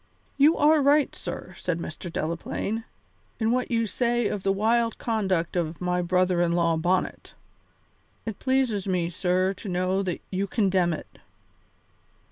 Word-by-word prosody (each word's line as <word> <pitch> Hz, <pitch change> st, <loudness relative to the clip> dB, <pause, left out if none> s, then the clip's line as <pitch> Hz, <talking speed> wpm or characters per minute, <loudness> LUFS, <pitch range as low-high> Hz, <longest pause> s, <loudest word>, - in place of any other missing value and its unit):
"You 295 Hz, +4 st, +5 dB
are 300 Hz, +1 st, +5 dB
right, 285 Hz, +1 st, +3 dB
sir," -, -, -6 dB
said 180 Hz, -2 st, -1 dB
Mr. 170 Hz, +1 st, -6 dB
Delaplaine, 170 Hz, +8 st, -3 dB, 0.5 s
"in 225 Hz, 0 st, +2 dB
what 250 Hz, +1 st, 0 dB
you 230 Hz, -1 st, +1 dB
say 240 Hz, +2 st, 0 dB
of 205 Hz, -, -3 dB
the 195 Hz, -, +1 dB
wild 230 Hz, +3 st, +1 dB
conduct 190 Hz, -8 st, -1 dB
of 165 Hz, -2 st, -1 dB
my 180 Hz, 0 st, 0 dB
brother 180 Hz, 0 st, +2 dB
in 170 Hz, -1 st, +2 dB
law 170 Hz, -1 st, +2 dB
Bonnet. 180 Hz, +3 st, -1 dB, 0.9 s
It 220 Hz, -3 st, -5 dB
pleases 260 Hz, -7 st, +1 dB
me, 175 Hz, -2 st, 0 dB
sir, 185 Hz, +2 st, +1 dB
to 195 Hz, +1 st, -8 dB
know 185 Hz, +2 st, 0 dB
that 185 Hz, -3 st, -2 dB
you 195 Hz, +1 st, -1 dB
condemn 190 Hz, -5 st, +2 dB
it." -, -, -9 dB
190 Hz, 150 wpm, -26 LUFS, 175-230 Hz, 0.9 s, You